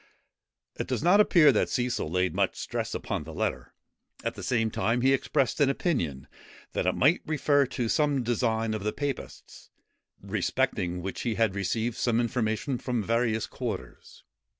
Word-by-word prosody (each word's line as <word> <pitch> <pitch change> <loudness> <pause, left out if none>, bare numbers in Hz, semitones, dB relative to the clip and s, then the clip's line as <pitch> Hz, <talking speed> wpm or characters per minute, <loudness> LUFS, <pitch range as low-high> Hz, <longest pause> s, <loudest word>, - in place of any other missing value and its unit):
It - - -2
does - - -2
not 180 +4 +5
appear 165 -8 +6
that 110 - +1
Cecil 120 -9 -1
laid 90 +2 0
much - - +1
stress - - -4
upon - - -3
the 80 +1 -9
letter; - - -3 0.5
at - - -1
the - - -9
same 115 -3 0
time 115 +3 0
he 135 +2 +4
expressed 135 0 0
an 140 - +5
opinion, 85 - -1 0.5
that - - -1
it - - +2
might 150 +6 +3
refer 145 -3 +2
to 120 -2 -2
some 145 0 +1
design 115 -1 0
of 110 -2 -4
the 105 - -1
papists, 145 -2 -6 0.5
respecting 90 0 -1
which 95 - -4
he 115 -3 -1
had 110 -4 +2
received 110 +4 -1
some 120 -2 +1
information 120 +1 -1
from 120 -4 -2
various 115 0 +1
quarters. 100 - -7
120 Hz, 165 wpm, -28 LUFS, 110-135 Hz, 0.5 s, appear